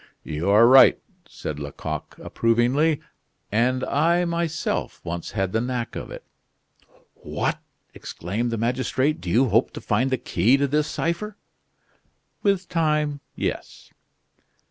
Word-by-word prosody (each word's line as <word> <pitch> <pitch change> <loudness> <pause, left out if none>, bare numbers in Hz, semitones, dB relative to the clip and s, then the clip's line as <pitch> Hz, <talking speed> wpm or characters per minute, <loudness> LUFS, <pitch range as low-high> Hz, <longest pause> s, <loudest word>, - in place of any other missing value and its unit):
"You 80 +5 -3
are 105 +3 +7
right," 130 +2 +7 0.3
said 75 -1 -6
Lecoq, 75 +2 -6
approvingly. 125 +7 +1 0.5
"And 125 +4 +1
I, 170 +4 +2
myself, 170 -2 -2
once 85 0 -5
had 95 -3 -1
the 110 - 0
knack 125 -1 -3
of - - -6
it." - - -9 0.9
"What!" - - -3 0.3
exclaimed 105 +8 -4
the 115 - -2
magistrate; 130 +5 0
"do 90 - -5
you 125 +7 +3
hope 115 +4 +3
to - - -6
find 120 +5 0
the 130 - +1
key 125 +3 +2
to 140 - +1
this 150 +2 +1
cipher?" 200 +6 -3 1.0
"With 195 -3 +1
time, 150 -3 0 0.2
yes." - - -5
130 Hz, 130 wpm, -24 LUFS, 110-150 Hz, 1.0 s, are